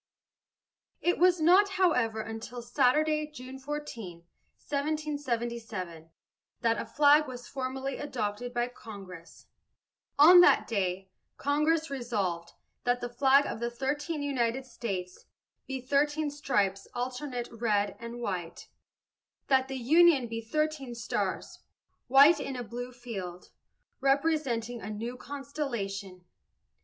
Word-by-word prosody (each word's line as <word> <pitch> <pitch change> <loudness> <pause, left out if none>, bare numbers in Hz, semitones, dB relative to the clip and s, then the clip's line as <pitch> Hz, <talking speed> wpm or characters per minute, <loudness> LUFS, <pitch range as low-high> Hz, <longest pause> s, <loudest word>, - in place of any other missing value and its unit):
It 350 - +1
was 360 0 +5
not, 370 +6 +5
however, 250 -12 +2
until 225 +2 -7
Saturday, 305 +6 +2
June 265 -2 -9
14, 245 - -6 0.4
1777, 235 - -3 0.5
that 230 -2 +1
a - - -7
flag 295 +1 +5
was 245 -1 -8
formally 265 0 -4
adopted 245 -4 -3
by 240 0 0
Congress. 195 -8 -11 0.7
On 350 +5 +9
that - - +5
day, 190 -3 -2 0.3
Congress 300 +2 +1
"Resolved, 200 -10 -2 0.3
That 245 0 +1
the 245 - -4
flag 270 +3 +4
of - - -4
the 235 0 -1
thirteen 290 +5 -3
United 260 -2 -1
States 195 -7 -5 0.4
be 270 -1 -3
thirteen 295 +3 +1
stripes 200 -9 0
alternate 250 0 -3
red 210 -3 0
and 235 +1 -7
white; 180 -7 -5 0.8
that 265 -1 +4
the 270 0 -4
union 300 +2 +5
be 230 0 -4
thirteen 285 +1 -2
stars, 230 -2 -3 0.5
white 280 +5 +7
in 275 -2 -4
a 245 - -4
blue 245 +3 -6
field, 200 -8 -7 0.5
representing 270 -5 0
a 205 - -6
new 225 +4 -4
constellation." 230 -10 -5
250 Hz, 115 wpm, -29 LUFS, 225-290 Hz, 0.8 s, On